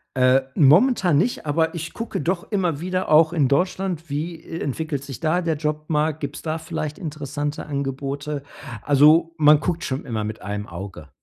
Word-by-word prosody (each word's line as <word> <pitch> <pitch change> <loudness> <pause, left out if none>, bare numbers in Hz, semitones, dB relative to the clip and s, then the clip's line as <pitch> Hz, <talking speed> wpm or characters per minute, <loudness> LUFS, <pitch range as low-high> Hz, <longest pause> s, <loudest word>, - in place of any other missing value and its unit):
Äh, 130 +1 +4
momentan 175 - +5
nicht, 205 +6 0
aber 160 +3 0
ich 165 -1 -5
gucke 230 0 -4
doch 175 +6 -2
immer 180 -8 0
wieder 185 +2 -2
auch 155 +1 +6
in 155 -6 +2
Deutschland. 175 +2 -1
Wie 155 +4 -3
e 165 - -6
entwickelt 145 0 -3
sich 135 -4 -8
da 165 +3 +1
der 165 -2 0
Jobmarkt? 150 0 -1
Gibt's 145 -1 -5
da 155 0 -2
vielleicht 155 -1 -5
interessante 145 -3 -4
Angebote? 140 +1 -3 0.4
Also, 150 +4 +5
man 150 -1 +6
guckt 170 +2 -2
schon 130 -4 -3
immer 110 -4 -3
mit 110 +1 -5
einem 105 +1 -5
Auge. 85 -3 -8
150 Hz, 170 wpm, -23 LUFS, 140-165 Hz, 0.4 s, auch